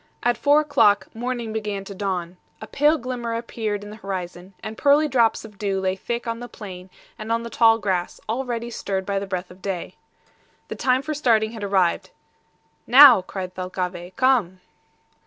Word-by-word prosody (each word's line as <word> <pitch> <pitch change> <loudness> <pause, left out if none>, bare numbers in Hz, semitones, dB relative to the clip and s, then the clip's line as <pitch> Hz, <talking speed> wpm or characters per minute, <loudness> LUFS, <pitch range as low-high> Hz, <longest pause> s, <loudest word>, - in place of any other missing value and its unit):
At 240 0 +2
four 290 +6 +4
o'clock 225 -10 +2
morning 235 -1 -4
began 210 -3 -3
to 200 - -8
dawn. 185 -3 -3 0.2
A - - -7
pale 295 +6 +2
glimmer 240 -2 -4
appeared 220 -3 -3
in 205 - -9
the 215 - -10
horizon, 185 -2 -6
and 215 - -6
pearly 290 +5 +4
drops 235 -5 +2
of 210 -3 -14
dew 195 -2 -1
lay 190 0 0
thick 235 +5 -4
on 230 0 -3
the 245 - -7
plain 185 -3 -10 0.3
and 215 +1 -5
on 230 0 0
the 235 - -7
tall 225 -1 +5
grass, 190 -4 -2
already 235 0 -3
stirred 195 -4 -3
by 200 0 -1
the 200 - -6
breath 185 -1 -4
of 185 +1 -16
day. 190 -3 -4 0.8
The - - -4
time 260 +1 +1
for 310 - -3
starting 225 -7 +2
had 225 -3 -8
arrived. 190 -4 +1 0.8
"Now!" 260 -4 +9
cried 185 0 -6
Thalcave, 180 -1 -5
"come." 235 -9 +2
215 Hz, 180 wpm, -23 LUFS, 190-240 Hz, 0.8 s, Now